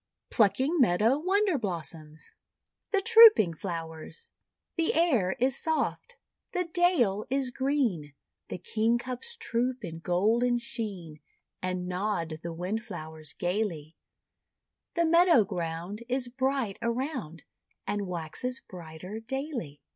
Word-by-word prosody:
PLUCKING 260 Hz, -, +2 dB
MEADOW 230 Hz, +4 st, +4 dB
WONDER 380 Hz, -1 st, +2 dB
BLOSSOMS 160 Hz, -5 st, -6 dB, 0.6 s
THE 400 Hz, -2 st, +2 dB
TROOPING 445 Hz, -, +8 dB
FLOWERS 165 Hz, -, -7 dB, 0.4 s
The 330 Hz, -2 st, +1 dB
air 255 Hz, -, +3 dB
is 255 Hz, +1 st, 0 dB
soft, 325 Hz, +9 st, -2 dB, 0.4 s
the 360 Hz, -1 st, +1 dB
dale 330 Hz, -, +2 dB
is 265 Hz, -1 st, 0 dB
green, 245 Hz, -, -1 dB, 0.3 s
The -, -, -5 dB
Kingcups 240 Hz, -, -1 dB
troop 245 Hz, -, -1 dB
in 165 Hz, -1 st, -7 dB
golden 220 Hz, +8 st, +2 dB
sheen, 205 Hz, -, -5 dB, 0.4 s
And 185 Hz, -1 st, -2 dB
nod 180 Hz, -4 st, -2 dB
the 170 Hz, -, -5 dB
Wind/lowers 165 Hz, -5 st, -5 dB
gaily; 175 Hz, -5 st, -2 dB, 1.0 s
The 340 Hz, -1 st, +3 dB
meadow 335 Hz, -, +6 dB
ground 175 Hz, +3 st, -4 dB
Is 250 Hz, -1 st, -1 dB
bright 260 Hz, -4 st, -1 dB
around, 235 Hz, -, -3 dB, 0.4 s
And 205 Hz, 0 st, -2 dB
waxes 180 Hz, +9 st, -4 dB
brighter 180 Hz, +4 st, -9 dB
daily. 250 Hz, -, -5 dB
220 Hz, 110 wpm, -29 LUFS, 175-270 Hz, 1.0 s, TROOPING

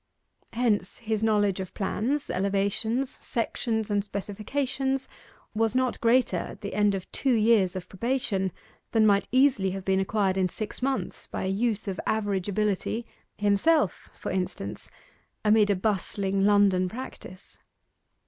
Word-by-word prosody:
Hence 220 Hz, -5 st, 0 dB
his 220 Hz, -2 st, -2 dB
knowledge 205 Hz, -3 st, +2 dB
of 190 Hz, -1 st, -6 dB
plans, 245 Hz, +9 st, -1 dB
elevations, 200 Hz, +6 st, 0 dB
sections, 225 Hz, -3 st, -2 dB
and 205 Hz, -1 st, +2 dB
specifications, 260 Hz, +7 st, -2 dB, 0.5 s
was 225 Hz, +2 st, +1 dB
not 255 Hz, -1 st, +1 dB
greater 235 Hz, -5 st, +3 dB
at -, -, -6 dB
the 200 Hz, -, -5 dB
end 205 Hz, -1 st, +3 dB
of 190 Hz, -1 st, -7 dB
two 265 Hz, -2 st, +1 dB
years 215 Hz, -5 st, +3 dB
of 180 Hz, -1 st, -5 dB
probation 200 Hz, -3 st, -1 dB, 0.4 s
than 220 Hz, -1 st, +5 dB
might 200 Hz, -1 st, +3 dB
easily 255 Hz, -7 st, +4 dB
have 190 Hz, -, -8 dB
been 190 Hz, 0 st, +2 dB
acquired 195 Hz, -1 st, +1 dB
in 185 Hz, -1 st, +2 dB
six 215 Hz, +4 st, -6 dB
months 270 Hz, +1 st, -2 dB
by -, -, -4 dB
a -, -, -1 dB
youth 220 Hz, +2 st, -1 dB
of 190 Hz, -2 st, -3 dB
average 205 Hz, -3 st, 0 dB
ability 210 Hz, +3 st, -1 dB, 0.3 s
himself, 205 Hz, -, +2 dB
for -, -, -5 dB
instance 180 Hz, -, -4 dB, 0.6 s
amid 210 Hz, -1 st, +5 dB
a 200 Hz, -, +3 dB
bustling 195 Hz, 0 st, 0 dB
London 200 Hz, -3 st, +4 dB
practice. 200 Hz, -5 st, -9 dB
205 Hz, 140 wpm, -27 LUFS, 195-230 Hz, 0.6 s, than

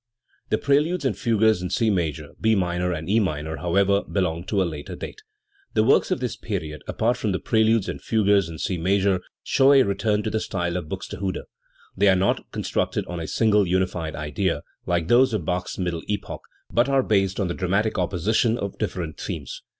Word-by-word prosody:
The 110 Hz, -, +2 dB
preludes 150 Hz, +5 st, +1 dB
and 130 Hz, -, +1 dB
fugues 110 Hz, -4 st, +2 dB
in 90 Hz, -, -3 dB
C 110 Hz, +4 st, +2 dB
major, 80 Hz, -5 st, -2 dB
B 110 Hz, 0 st, +4 dB
minor 90 Hz, -1 st, 0 dB
and 80 Hz, -2 st, -4 dB
E 105 Hz, +4 st, +3 dB
minor, 80 Hz, -5 st, -2 dB
however, 100 Hz, +3 st, +2 dB
belong 85 Hz, -4 st, -1 dB
to 100 Hz, +2 st, 0 dB
a 95 Hz, -, +3 dB
later 85 Hz, +3 st, -6 dB
date. 430 Hz, -, -8 dB, 0.5 s
The -, -, +4 dB
works 125 Hz, -, +4 dB
of -, -, 0 dB
this 125 Hz, -1 st, -3 dB
period, 80 Hz, -8 st, -5 dB
apart 120 Hz, +3 st, 0 dB
from 105 Hz, -3 st, -1 dB
the 95 Hz, -, -1 dB
preludes 110 Hz, -2 st, +2 dB
and -, -, -5 dB
fugues 100 Hz, -5 st, +2 dB
in 80 Hz, -, -7 dB
C 90 Hz, +2 st, -2 dB
major, 95 Hz, +1 st, +2 dB, 0.2 s
show 135 Hz, +1 st, +4 dB
a 135 Hz, -1 st, +7 dB
return 105 Hz, +1 st, 0 dB
to 110 Hz, -, -2 dB
the 110 Hz, -, 0 dB
style 85 Hz, -4 st, -2 dB
of 90 Hz, -4 st, -4 dB
Buxte -, -, -6 dB
hude. 95 Hz, -2 st, -2 dB, 0.5 s
They 100 Hz, +1 st, +4 dB
are 95 Hz, -, +5 dB
not 95 Hz, +1 st, 0 dB
constructed -, -, -1 dB
on 90 Hz, -1 st, -5 dB
a 80 Hz, -, -4 dB
single 105 Hz, -4 st, +3 dB
unified 90 Hz, -3 st, -1 dB
idea, 75 Hz, 0 st, -2 dB, 0.2 s
like 85 Hz, -2 st, 0 dB
those 120 Hz, +1 st, +4 dB
of 90 Hz, -7 st, -3 dB
Bach's 90 Hz, +1 st, -2 dB
middle 85 Hz, -3 st, -2 dB
epoch, 105 Hz, 0 st, -4 dB, 0.3 s
but 120 Hz, +3 st, +3 dB
are 135 Hz, -1 st, +3 dB
based 95 Hz, -3 st, +1 dB
on 100 Hz, -, +1 dB
the 85 Hz, -, -2 dB
dramatic 100 Hz, +4 st, 0 dB
opposition 105 Hz, +6 st, +1 dB
of -, -, -5 dB
different -, -, -3 dB
themes. -, -, -5 dB
95 Hz, 200 wpm, -24 LUFS, 90-110 Hz, 0.5 s, a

